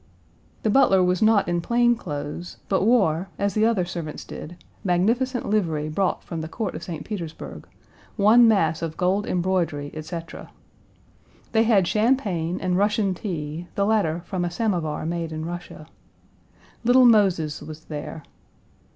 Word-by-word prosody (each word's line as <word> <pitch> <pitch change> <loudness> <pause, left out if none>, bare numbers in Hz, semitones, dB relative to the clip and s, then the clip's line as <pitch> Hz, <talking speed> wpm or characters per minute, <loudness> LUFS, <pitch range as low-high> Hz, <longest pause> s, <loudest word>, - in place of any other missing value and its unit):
The 215 - +2
butler 195 -7 +5
was 180 0 +1
not 215 -2 +4
in 175 0 0
plain 240 +4 +3
clothes, 150 -2 -6
but 195 - +1
wore, 195 -6 +2
as 200 0 0
the 215 - 0
Page - - +5
193 - - +5
other 205 -6 +1
servants 170 -4 -6
did, 170 +2 -9 0.2
magnificent 230 +8 +1
livery 165 -8 0
brought 185 +4 -1
from 165 -2 -5
the 160 - -5
Court 205 +3 -4
of - - -6
St. 170 -3 -6
Petersburg, 170 -7 -7 0.5
one 230 +3 +6
mass 165 -8 +2
of 165 -1 -4
gold 190 +3 +1
embroidery, 175 -5 -1
etc. 165 +2 -7 1.0
They 225 0 +3
had 200 -6 +4
champagne 205 -7 +1
and 185 0 0
Russian 205 -1 +2
tea, 170 -3 -5
the 200 - +1
latter 195 -6 +1
from 185 -3 -3
a 175 - -1
samovar 170 -6 -1
made 165 0 -3
in 155 0 -4
Russia. 175 -2 -7 1.0
Little 250 +2 +6
Moses 190 -9 +3
was 155 0 -9
there. 150 +1 -7
180 Hz, 155 wpm, -24 LUFS, 165-215 Hz, 1.0 s, one